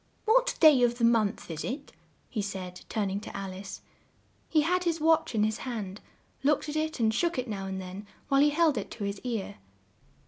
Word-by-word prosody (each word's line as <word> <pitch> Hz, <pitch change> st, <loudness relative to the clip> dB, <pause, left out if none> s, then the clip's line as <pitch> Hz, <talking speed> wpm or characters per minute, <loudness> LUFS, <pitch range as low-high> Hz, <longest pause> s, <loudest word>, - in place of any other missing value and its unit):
"What -, -, +3 dB
day 305 Hz, -6 st, +7 dB
of 240 Hz, -1 st, +3 dB
the 240 Hz, -, -2 dB
month 225 Hz, -5 st, +2 dB
is 160 Hz, -1 st, -4 dB
it?" 280 Hz, +3 st, -5 dB, 0.4 s
he 220 Hz, -, -3 dB
said, 185 Hz, -3 st, -6 dB
turn 205 Hz, -3 st, -1 dB
ing 195 Hz, -, -2 dB
to 215 Hz, -, -8 dB
Al 195 Hz, -1 st, -5 dB
ice. 190 Hz, 0 st, -8 dB, 0.7 s
He 310 Hz, -, +4 dB
had 360 Hz, +4 st, +1 dB
his 335 Hz, -2 st, 0 dB
watch 320 Hz, -5 st, +3 dB
in 210 Hz, -, +3 dB
his 215 Hz, +1 st, 0 dB
hand, 210 Hz, -6 st, -5 dB, 0.4 s
looked 295 Hz, +2 st, +2 dB
at 300 Hz, -, -4 dB
it 310 Hz, -2 st, -1 dB
and 220 Hz, -1 st, +3 dB
shook 340 Hz, +7 st, 0 dB
it 255 Hz, 0 st, -2 dB
now 195 Hz, -3 st, -4 dB
and 190 Hz, 0 st, -4 dB
then 190 Hz, +2 st, -8 dB, 0.2 s
while 275 Hz, 0 st, +4 dB
he 295 Hz, -, +6 dB
held 300 Hz, -4 st, +3 dB
it 200 Hz, -, -6 dB
to 215 Hz, -, -5 dB
his 200 Hz, 0 st, -3 dB
ear. 230 Hz, -6 st, -3 dB
230 Hz, 215 wpm, -29 LUFS, 200-300 Hz, 0.7 s, day